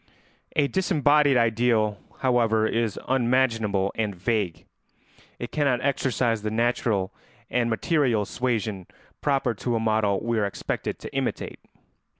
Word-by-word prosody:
] - - -33
A - - +2
disembodied 150 -6 +3
ideal, 115 -2 +2 0.2
however, 115 -4 +3
is 115 -2 0
unmanageable 115 -6 +1
and 105 -3 -2
vague; 95 -2 -1 0.7
it 120 - -6
cannot 140 -5 +1
exercise 125 -5 +1
the 105 - -2
natural 110 -4 0 0.4
and 120 -1 +1
material 120 - +1
suasion 110 -6 -2 0.3
proper 135 -4 +1
to 120 +3 -2
a - - +1
model 110 -3 +1
we 115 -1 -1
are 105 - +1
expected 100 - -4
to - - -9
imitate. - - -2
115 Hz, 130 wpm, -25 LUFS, 110-130 Hz, 0.7 s, disembodied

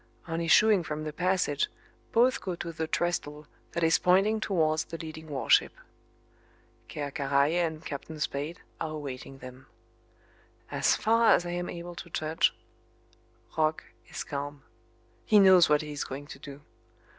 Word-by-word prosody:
On 165 0 -2
issuing 205 +4 +5
from 155 -2 -5
the 155 -1 -5
passage 180 -5 +1 0.4
both 255 +3 +3
go 185 -2 -3
to 170 0 -5
the 160 0 -3
trestle 155 -3 -2 0.3
that 170 - -1
is 165 0 +4
pointing 195 +5 +3
towards 160 -7 +1
the 165 - -7
leading 160 -1 -8
warship. 140 -3 +3 1.2
Ker 145 -1 -4
Karraje 140 +5 +2
and 160 -1 -4
Captain 155 +2 -6
Spade 145 +3 -3 0.2
are 155 -1 -3
awaiting 135 -2 -7
them. 130 0 -12 1.0
As - - +2
far 230 +1 +4
as 175 - -2
I 175 - -3
am 175 0 -3
able 175 0 -7
to 170 - -9
judge, 155 0 +1 1.0
Roch 155 0 +1 0.2
is - - -5
calm. 145 0 -6 0.6
He 215 - +4
knows 185 -4 +7
what 150 0 +3
he 150 - -7
is 145 - -3
going 140 +2 -7
to 135 - -11
do. 140 0 -10
160 Hz, 155 wpm, -28 LUFS, 145-175 Hz, 1.2 s, knows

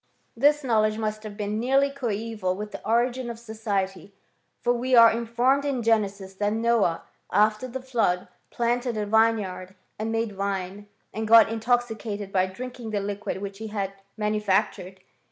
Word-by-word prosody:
This 290 +4 +3
knowledge 215 -3 +2
must 215 -1 -2
have 210 -2 -9
been 210 0 -2
nearly 270 +4 +2
coeval 220 -7 -2
with 210 +2 -6
the - - -8
origin 240 +2 +1
of 235 - -6
society; 205 -4 -4 0.4
for 240 - +1
we 250 +2 +1
are 230 -1 +9
informed 235 +4 +1
in 275 -4 -1
Genesis 200 -4 0
that 205 +2 -1
Noah, 225 -7 +1 0.3
after 215 +4 +2
the 255 +1 -6
flood, 225 -9 0 0.2
planted 240 0 -1
a 210 - -1
vineyard, 205 -4 +1 0.2
and 220 +1 -2
made 225 -2 -1
wine, 195 0 -3 0.3
and 220 0 -3
got 225 0 +8
in 225 - -2
toxicated 220 -4 -1
by 185 -1 +2
drinking 245 +3 -7
the 210 -1 -1
liquid 200 0 -4
which 200 0 -6
he 220 - -5
had 200 -2 -3 0.2
manu 210 0 0
factured. 190 -2 0
220 Hz, 165 wpm, -25 LUFS, 205-235 Hz, 0.4 s, are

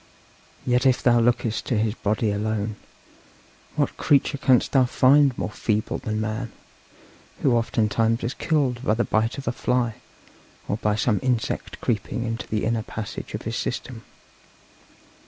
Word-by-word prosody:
Yet 125 +1 +3
if 130 - +2
thou 120 -1 +5
lookest 115 -1 +1
to 120 - +1
his 105 0 +1
body 110 0 0
alone, 105 +1 -2 1.0
what - - 0
creature 140 0 +2
canst 130 -3 +3
thou 130 -2 +5
find 135 +1 +4
more - - -3
feeble 110 0 -1
than 110 0 -3
man, 110 +1 -3 0.9
who 135 - +4
oftentimes 115 0 +1
is 120 - -1
killed 135 -6 0
by 110 - +2
the 120 - +1
bite 110 +3 0
of 135 - -7
a - - +2
fly, 125 -2 0 0.7
or 100 - -1
by 105 -2 0
some 105 0 +1
insect 125 -4 -2
creeping 120 +2 -1
into 115 -1 -4
the 105 -1 -1
inner 115 0 0
passage 110 -1 -6
of - - -6
his - - -3
system! - - -4
115 Hz, 155 wpm, -24 LUFS, 110-125 Hz, 1.0 s, thou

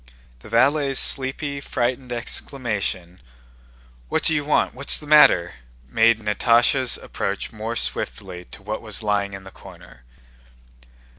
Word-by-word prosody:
The 65 - -14
valet's 135 +4 +2
sleepy, 140 +1 -1
frightened 125 -1 -3
exclamation, 105 -7 -4 0.9
"What - - 0
do 160 - +5
you 150 -1 0
want? 150 - +1
What's 140 +3 +2
the 150 - -11
matter?" 120 - +5 0.3
made 115 - +3
Natásha 115 +4 +2
approach - - -4
more 110 +1 -5
swiftly 90 -5 -4
to 100 - -14
what 105 +2 -5
was 110 -1 -2
lying 100 -1 -1
in 95 - -10
the 95 - -12
corner. - - -15
115 Hz, 130 wpm, -22 LUFS, 100-135 Hz, 0.9 s, do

